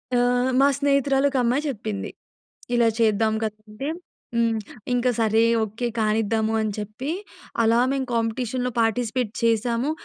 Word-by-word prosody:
ఆహ్, 245 +1 +2
మా 275 - +6
స్నేహితురాలొక 280 -1 +2
అమ్మాయి 250 +5 +1
చెప్పింది. 215 -5 -4 0.7
ఇలా 235 -1 +4
చేద్దాం 220 0 +3
కదా! 215 -1 -4
అంటే 245 +7 -5 0.5
హ్మ్. 230 -1 +2 0.3
ఇంక 245 0 +1
సరే 220 0 +3 0.2
ఓకే 220 +3 -3
కానిద్దామూ 220 0 +1
అని 215 -1 -1
చెప్పి, 215 +7 -5 0.5
అలా 230 +1 +4
మేము 265 -2 -1
కాంపిటీషన్‌లో 245 +2 -1
పార్టిసిపేట్ 230 0 0
చేసాము. 230 +4 +1
230 Hz, 125 wpm, -24 LUFS, 220-250 Hz, 0.7 s, మా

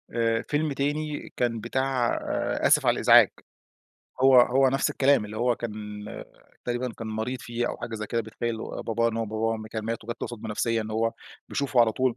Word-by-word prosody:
آآ 115 -1 +1
فيلم 150 0 0
تاني 145 +2 -3
كان 120 -2 0
بتاع 130 +1 0 0.5
آسف - - +4
على - - +5
الإزعاج - - +7 0.9
هو 130 -1 +8
هو 130 +2 +4
نفس 135 +1 +1
الكلام 135 -4 +3
اللي 105 +1 -8
هو 120 +1 +1
كان 110 -3 -5 0.9
تقريبًا 120 0 -2
كان 115 - -5
مريض 110 +4 -3
فيه 120 0 -2
أو - - -4
حاجة 115 - -6
زي 105 -1 -4
كده 115 +3 -1
بيتخيل 115 +1 -4
باباه، 115 +1 -1
إن 115 - -4
هو 115 - 0
باباه 110 +1 -1
م 110 0 -8
كان 110 -1 -5
مات 115 0 -3
وجت 120 +1 -5
له - - -2
صدمة 115 -1 -7
نفسيّة 115 +2 0
إن 110 - -7
هو 115 +1 0 0.4
بيشوفه 140 -4 +1
على 115 -2 +4
طول 130 0 0
115 Hz, 195 wpm, -26 LUFS, 110-130 Hz, 0.9 s, هو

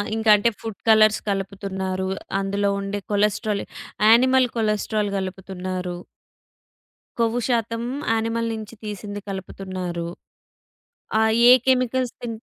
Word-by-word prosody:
ఇంక 225 0 -3
అంటే 210 +3 +2
food 220 -3 -6
colours 215 0 +6
కలుపుతున్నారు. 190 -1 -3 0.3
అందులో 200 +1 0
ఉండే 200 +1 -3
కొలెస్టెరాల్ 210 0 +1 0.5
యానిమల్ 255 +2 +5
కొలెస్టెరాల్ 215 -1 0
గలుపుతున్నారు. 185 -1 -4 1.2
కొవ్వు 230 +1 +2
శాతం 230 -2 0 0.3
యానిమల్ 230 +1 -1
నించి 220 +1 -7
తీసింది 205 -1 -6
కలుపుతున్నారు. 185 -3 -5 1.1
ఆహ్, 220 0 +3
ఏ - - +10
కెమికల్స్ 255 -1 +1
తిన్ 240 -2 -4
210 Hz, 100 wpm, -23 LUFS, 195-230 Hz, 1.2 s, ఏ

